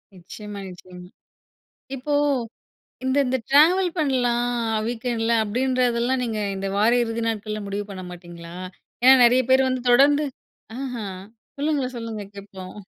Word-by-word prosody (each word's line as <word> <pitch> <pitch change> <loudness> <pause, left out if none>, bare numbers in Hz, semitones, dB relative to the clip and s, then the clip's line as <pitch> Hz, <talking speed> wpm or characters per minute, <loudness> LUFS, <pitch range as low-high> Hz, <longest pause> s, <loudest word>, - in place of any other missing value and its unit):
நிச்சியமா, 200 +3 -9
நிச்சியமா. 180 0 -12 0.9
இப்போ 270 +3 -4 0.9
இந்த 260 +2 +1
இந்த 260 +1 0
ட்ராவல் 350 +6 +5
பண்லாம் 245 -4 +1 0.4
வீக்கெண்டுல 235 -1 -1
அப்டின்றதெல்லாம் 250 +2 0
நீங்க 220 -2 -3 0.2
இந்த 195 0 -3
வார 215 +3 +4
இறுதி 230 0 -3
நாட்கள்ல 215 -1 -3
முடிவு 200 +1 -3
பண்ண 185 -1 -7
மாட்டீங்களா? 175 -1 -11 0.5
ஏன்னா, 260 +1 +9
நெறைய 250 +2 +5
பேரு 265 0 +6
வந்து 255 -1 -2
தொடர்ந்து 285 +4 +5 0.6
ஆஹா 245 -5 -4 0.5
சொல்லுங்க, 290 -3 0
சொல்லுங்க 225 -3 -5
கேட்போம். 190 -2 -10
235 Hz, 120 wpm, -23 LUFS, 205-260 Hz, 0.9 s, ஏன்னா